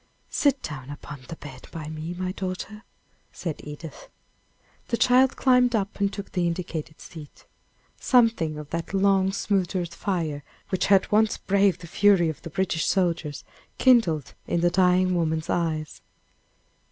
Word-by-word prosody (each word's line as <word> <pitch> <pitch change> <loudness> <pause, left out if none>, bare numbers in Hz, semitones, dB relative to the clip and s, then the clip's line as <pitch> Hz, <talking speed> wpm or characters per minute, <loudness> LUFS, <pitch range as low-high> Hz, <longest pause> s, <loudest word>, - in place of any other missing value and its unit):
"Sit 280 -2 +2
down 135 -4 -6
upon 145 0 -8
the 165 - -7
bed 135 -5 -11
by 155 -2 -7
me, 155 +2 -5
my 185 +1 -3
daughter," 190 +3 -5 0.5
said 165 -4 -5
Edith. 150 +1 -9 0.8
The 235 - -1
child 255 +2 +4
climbed 250 -2 +3
up 205 -1 -2
and 200 -1 +1
took 200 -1 -7
the 180 -2 0
indicated 165 -2 -4
seat. 155 -4 -12 0.5
Something 225 - +3
of 150 -1 -9
that 170 +4 -3
long 195 -1 +3
smothered 185 -3 -1
fire, 165 -7 -2 0.3
which 185 - 0
had 195 -1 +4
once 215 +1 +3
braved 195 -3 +2
the - - -8
fury 185 -1 +3
of 155 - -6
the - - -8
British 170 -1 -1
soldiers, 170 -6 0 0.3
kindled 205 - +3
in 170 - 0
the 175 0 +3
dying 185 0 +3
woman's 160 -2 -1
eyes. 160 -3 -2
180 Hz, 150 wpm, -25 LUFS, 160-200 Hz, 0.8 s, child